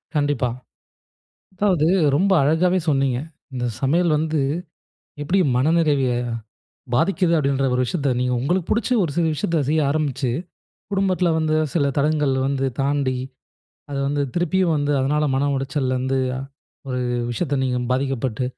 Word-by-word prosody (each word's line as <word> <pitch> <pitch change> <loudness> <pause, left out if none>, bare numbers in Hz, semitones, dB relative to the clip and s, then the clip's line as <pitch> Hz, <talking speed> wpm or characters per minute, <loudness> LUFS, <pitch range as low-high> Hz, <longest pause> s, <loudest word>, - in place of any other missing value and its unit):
கண்டிப்பா. 145 -4 +1 1.1
அதாவது 185 -5 +2 0.3
ரொம்ப 195 +5 +2
அழகாவே 170 +6 +3
சொன்னீங்க. 135 -4 +2 0.4
"இந்த 125 -1 -2 0.2
சமையல் 160 +4 +2
வந்து 155 0 0 0.8
எப்படி 175 +7 +1 0.2
மனநிறைவ 150 +1 +2 0.9
பாதிக்கிது." 180 +4 +2
அப்படீன்ற 135 -2 +1
ஒரு 125 - +2
விஷயத்தை 140 -1 -1
நீங்க 125 0 0
உங்களுக்கு 175 +6 -1
புடிச்ச 230 - +1
ஒரு 165 - -2
சில 170 -1 +2
விஷயத்தை 160 +2 0
செய்ய 155 +1 +2
ஆரம்பிச்சு, 145 -4 -1 0.6
குடும்பத்தில 190 -3 +1
வந்து 155 -1 +1 0.2
சில 150 -5 +2
தடங்கல் 150 -1 +2
வந்து 135 -1 0
தாண்டி, 135 -2 0 0.7
அதை 140 - -3
வந்து 145 0 0
திருப்பியும் 175 0 +2
வந்து, 145 0 0
அதனால 150 +3 +1
மன 140 +2 +1
உளைச்சல் 135 -1 -1
வந்து, 130 +1 0 0.7
ஒரு 125 -1 -2 0.3
விஷயத்தை 140 +3 -1
நீங்க 125 -1 0
பாதிக்கப்பட்டு, 130 -2 -1
145 Hz, 130 wpm, -22 LUFS, 135-165 Hz, 1.1 s, அழகாவே